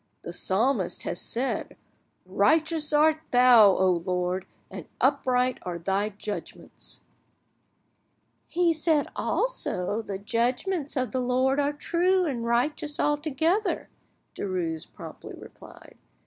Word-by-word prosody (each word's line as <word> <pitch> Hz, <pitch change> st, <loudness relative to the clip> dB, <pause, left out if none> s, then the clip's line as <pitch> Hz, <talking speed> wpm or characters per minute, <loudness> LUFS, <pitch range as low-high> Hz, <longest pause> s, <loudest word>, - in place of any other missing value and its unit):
The 170 Hz, -, -6 dB
Psalmist 195 Hz, +2 st, 0 dB
has 175 Hz, -, -3 dB
said, 255 Hz, +3 st, -2 dB, 0.5 s
'Righteous 315 Hz, -1 st, +2 dB
art 310 Hz, +1 st, +4 dB
Thou, 245 Hz, -4 st, +7 dB
O 185 Hz, 0 st, +3 dB
Lord, 180 Hz, 0 st, -2 dB, 0.2 s
and -, -, -8 dB
upright 255 Hz, 0 st, +1 dB
are 175 Hz, -1 st, -5 dB
Thy 195 Hz, +4 st, -1 dB
judgments.'" 210 Hz, 0 st, -7 dB, 1.5 s
"He 350 Hz, 0 st, +1 dB
has 320 Hz, -2 st, 0 dB
said 310 Hz, -3 st, +2 dB
also, 225 Hz, -, -1 dB
'The 200 Hz, -3 st, -5 dB
judgments 250 Hz, -, -1 dB
of 255 Hz, -3 st, -1 dB
the 260 Hz, -, -1 dB
Lord 255 Hz, +2 st, +1 dB
are 285 Hz, 0 st, +1 dB
true 360 Hz, +5 st, +1 dB
and 255 Hz, -7 st, -2 dB
righteous 280 Hz, +5 st, -1 dB
altogether,'" 310 Hz, +7 st, 0 dB, 0.4 s
Derues 175 Hz, -5 st, -3 dB
promptly -, -, -10 dB
replied. -, -, -14 dB
255 Hz, 115 wpm, -26 LUFS, 200-305 Hz, 1.5 s, Thou